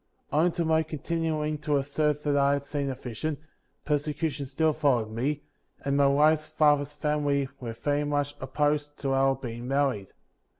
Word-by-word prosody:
58. - - 0
Owing 175 +2 +4
to 170 -2 -1
my 160 0 +3
continuing 155 -1 -2
to 150 -1 +1
assert 150 +1 0
that 145 -1 +1
I 140 0 +4
had 140 0 -2
seen 140 -1 -2
a 130 - -3
vision, 130 +5 -4 0.5
persecution 150 -1 -1
still 155 +4 +1
followed 130 -8 +1
me, 140 +6 -2 0.4
and 140 0 +1
my 140 0 +5
wife's 155 +2 +4
father's 150 -2 +2
family 145 -2 0
"were 115 -3 -5
very 145 +5 0
much 145 0 -1
opposed 145 +2 -1
to 135 -1 0
our 135 0 +3
being 120 -2 -6
married. 135 -8 0
145 Hz, 170 wpm, -28 LUFS, 135-150 Hz, 0.5 s, my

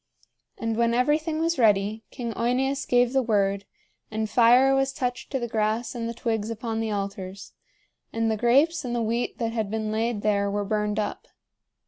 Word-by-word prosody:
And 225 -1 -2
when 235 0 +2
everything 300 +5 +1
was 330 -2 0
ready, 210 -1 +2
King 235 -4 -5
OEneus 265 +4 0
gave 245 0 +3
the 265 - +3
word, 200 -4 0 0.4
and 220 0 -2
fire 245 +4 +5
was 270 0 +1
touched 250 -1 -3
to 270 - 0
the 240 -2 -3
grass 220 +1 -1
and 230 -2 -3
the - - -4
twigs 225 -2 -2
upon 225 0 -3
the 225 -1 -1
altars; 195 -1 -5 0.6
and 225 0 0
the - - +1
grapes 280 +8 +3
and 240 -2 -3
the 235 - 0
wheat 230 +2 -1
that 230 -1 -1
had 220 -3 -2
been 215 0 -2
laid 225 -1 -1
there 200 -1 +1
were 205 0 -2
burned 210 0 -1
up. 210 -1 -3
230 Hz, 185 wpm, -25 LUFS, 215-250 Hz, 0.6 s, fire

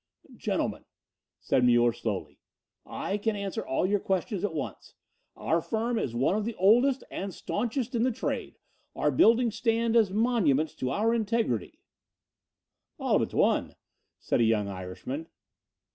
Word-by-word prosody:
"Gentlemen," - - -2 0.5
said 125 - +1
Muller 120 -1 +4
slowly, - - -4 0.5
"I 200 +2 -3
can 220 +1 0
answer 200 -2 -3
all 135 - 0
your 200 +2 +2
questions 190 +1 -2
at 195 -6 -1
once. 150 - -6 0.4
Our 165 +1 0
firm 225 +4 -1
is 120 - -3
one 130 +10 +2
of 215 - 0
the 230 +1 -4
oldest 245 +8 +4
and 195 0 -4
staunchest 240 +7 -3
in 235 - 0
the 255 +2 +2
trade. 225 - -4 0.4
Our - - +1
buildings 230 -1 +4
stand 230 0 +1
as 220 -4 +5
monuments 190 - +2
to 130 - -2
our 220 - +1
integrity 220 - -1 0.6
" - - -58
"All - - +2
but - - -2
one," - - +2 0.4
said - - 0
a - - +5
young 110 -2 +2
Irishman. 100 - -6
205 Hz, 150 wpm, -28 LUFS, 140-230 Hz, 0.6 s, as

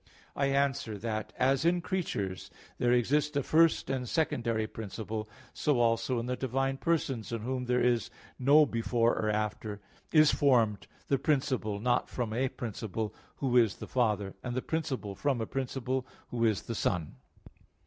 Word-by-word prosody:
I 140 - +1
answer 135 -6 0
that, 110 0 -3
As 135 +3 +2
in 175 +1 +3
creatures 155 - -3 0.3
there 120 - +3
exist 145 +5 +2
a 140 - +1
first 165 +3 +4
and 130 -2 -2
a - - -8
secondary 115 -7 0
principle, 110 0 -5 0.2
so 145 -5 +1
also 115 +2 +2
in 115 - -3
the 125 0 -1
divine 135 +1 -1
Persons, 135 -9 -1
in 115 -2 -3
Whom 125 +1 -2
there 125 0 +2
is 120 -1 +2 0.3
no 145 +4 +6
before 115 -1 +1
or 110 - 0
after, 105 0 -2 0.3
is 155 -1 +6
formed 115 -8 +3 0.2
the 140 - +2
principle 130 -8 0
not 125 +3 +1
from 115 -3 -3
a 130 +3 +1
principle, 110 -2 -4 0.2
Who 130 -3 -1
is 115 -5 +5
the - - -8
Father; 105 -6 0
and 120 -1 -3
the 130 - -1
principle 140 -10 -2
from 130 +6 0
a 110 - -1
principle, 130 0 -2 0.2
Who 115 -1 0
is 105 -5 +1
the 115 - -4
Son. 90 -7 -1
125 Hz, 170 wpm, -30 LUFS, 110-135 Hz, 0.3 s, no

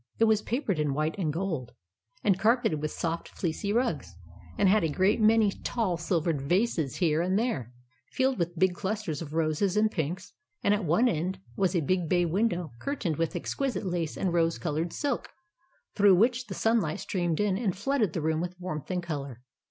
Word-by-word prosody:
It - - +3
was 220 -2 +4
papered 230 - -1
in 145 -2 0
white 155 +2 0
and 160 -5 0
gold, 160 -7 -3 0.5
and 195 -3 +3
car 225 +5 +4
peted 180 - -1
with 155 - -1
soft, 165 +1 -3
fleecy 185 +3 -3
rugs, 165 - -1 0.4
and - - +4
had 205 0 +4
a 165 - +1
great 190 +8 +2
many 215 -1 +5
tall, 215 -3 -1
silver 170 -1 0
vases 160 - 0
here 160 -3 +2
and 185 +2 +1
there, 210 - -1 0.4
filled 260 -2 +1
with 170 0 -2
big 185 +1 +3
clusters 190 -5 -3
of 155 -1 -6
roses 165 +5 +1
and 215 0 +3
pinks; 175 +2 -3 0.3
and 200 - +4
at 205 -2 0
one 175 +11 +3
end 185 -2 -1 0.2
was 190 -1 +1
a 170 - +3
big 175 +2 0
bay 175 -1 +3
window 175 - 0
curtained 205 - -2
with 165 +2 -1
exquisite 230 +4 -2
lace 175 -4 -2
and 185 -3 0
rose 165 -1 +2
coloured 165 +1 -2
silk, 280 -4 -2 0.6
through 200 -2 +6
which 240 +5 +2
the - - -6
sunlight 225 -9 +1
streamed 175 -4 -1
in 205 -2 +2
and 195 -4 -1
flooded 220 - 0
the 165 - -2
room 160 +1 0
with 180 +1 -5
warmth 175 -5 -5
and 180 -2 -1
colour. 140 -7 -5
180 Hz, 195 wpm, -28 LUFS, 160-210 Hz, 0.6 s, through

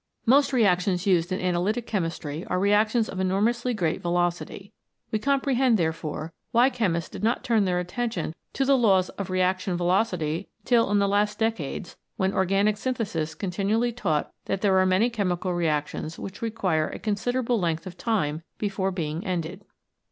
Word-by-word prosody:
Most 275 +4 +5
reactions 185 -6 +2
used 180 -2 +2
in 185 - -1
analytic 185 +6 0
Chemistry 165 -6 -3
are 180 - 0
reactions 215 +4 +3
of 185 - -6
enormously 220 +7 +1
great 175 -9 -1
velocity. 175 +3 -2 0.4
We 215 - 0
comprehend, 270 -2 +2
therefore, 160 -2 -3 0.2
why 245 +3 +4
chemists 185 -10 -1
did - - -8
not 230 +3 +1
turn 225 -5 +2
their 180 -1 +1
attention 180 -1 -3 0.2
to 270 - 0
the 275 +1 +5
laws 195 -7 +3
of 200 -2 -6
Reaction 185 0 0
Velocity 175 -2 0 0.2
till 235 -3 +3
in 205 - +3
the 200 0 +3
last 205 +1 +1
decades, 210 -8 -2 0.2
when 190 +1 +1
organic 195 +3 +2
synthesis 200 -11 -2
continually 205 +5 0
taught 175 -11 -1
that 195 -1 -2
there 195 -2 +3
are 185 - +4
many 195 +6 +3
chemical 185 -4 -1
reactions 155 -1 -2
which 195 +1 -8
require 190 -9 0
a - - -6
considerable 240 +3 0
length 165 -3 -1
of 180 -2 -8
time 175 -9 -1 0.2
before 195 -2 -1
being 165 -2 -3
ended. 180 -1 -3
195 Hz, 160 wpm, -26 LUFS, 175-225 Hz, 0.4 s, Most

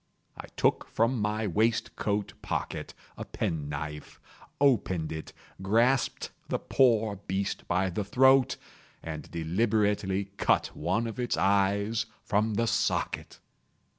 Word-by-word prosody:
I - - -9
took - - +2
from 115 +1 +1
my 105 +1 0
waistcoat 105 0 0
pocket - - -4 0.2
a - - -4
pen 75 -3 -3
knife, 75 +1 -6 0.4
opened 100 - +2
it, 80 0 -6 0.3
grasped 115 +7 +1 0.2
the - - 0
poor 110 -5 +2
beast 95 0 -3
by 90 +2 +1
the 105 +4 -2
throat, 130 +5 +4 0.5
and 80 -2 -6
deliberately 100 +2 0
cut - - +1
one 115 +1 0
of 115 +2 -5
its 120 -1 0
eyes 100 +3 +2 0.2
from 105 +1 +1
the 115 +2 +1
socket! - - -1
105 Hz, 120 wpm, -29 LUFS, 95-115 Hz, 0.5 s, throat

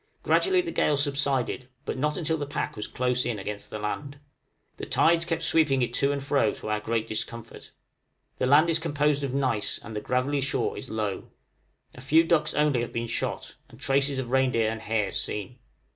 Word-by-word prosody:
Gradually 375 -1 +3
the 345 -1 -5
gale 150 - +2
subsided, 140 -3 0 0.2
but - - -2
not 150 +3 -1
until 160 -2 0
the 145 - -3
pack 145 - -3
was 105 - -4
close 125 0 0
in 120 -3 -2
against 105 +1 -6
the - - -5
land. 140 +7 -4 0.6
The - - -6
tides 170 +1 +3
kept 165 -1 -2
sweeping 145 -6 +3
it 120 - -2
to 140 0 +2
and 140 -1 -2
fro, 140 -6 +2
to - - -7
our 105 0 +1
great 115 +1 -1
discomfort. 115 +1 -5 0.7
The 130 - +1
land 145 +5 +6
is 165 -1 +2
composed 150 -2 +1
of 135 -1 -2
gneiss, 130 -6 0
and 110 +1 -9
the 105 - -2
gravelly 130 +5 0
shore 140 - -1
is 130 - -7
low. 105 -3 -3 0.6
A 125 - -11
few 155 +5 +5
ducks 165 -2 +1
only 150 -4 +2
have 120 - -4
been 115 0 -2
shot, 115 - -3
and - - -16
traces 140 0 +1
of 125 -2 -3
reindeer 125 -4 +2
and 110 -1 -6
hares 105 -2 0
seen. 105 +5 -5
130 Hz, 200 wpm, -27 LUFS, 115-145 Hz, 0.7 s, land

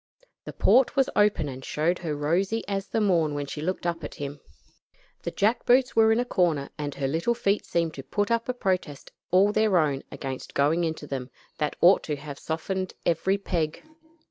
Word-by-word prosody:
The - - -7
port 260 -1 +4
was 270 -1 +2
open 205 -7 +3
and 130 -1 -7
showed 165 +6 0
her 160 -4 -3
rosy 180 +9 0
as 195 -1 -2
the - - -1
morn 170 -8 +2
when 145 0 -2
she 150 +2 -6
looked 180 +2 -3
up 170 -2 -2
at - - -6
him. 145 0 -6 0.8
The - - -3
jack 215 +4 +1
boots 250 +1 +3
were 220 0 +5
in 225 - +3
a 245 - +1
corner, 165 - 0
and 145 -2 -5
her 135 - -1
little 165 - 0
feet 205 -3 0
seemed 165 -2 0
to 135 - -8
put 205 - -1
up 230 +1 0
a - - +1
protest 185 - -2 0.2
all 190 +3 +4
their 215 -3 +3
own, 145 -4 +1
against 135 -2 -6
going 155 +5 +2
into 160 -2 -4
them, 135 -3 -5 0.3
that 150 -1 -1
ought 180 +3 +6
to 150 - -2
have 145 -1 -9
softened 185 +4 -3
every 180 +4 +2
peg. 170 -6 -2
170 Hz, 200 wpm, -26 LUFS, 150-200 Hz, 0.8 s, ought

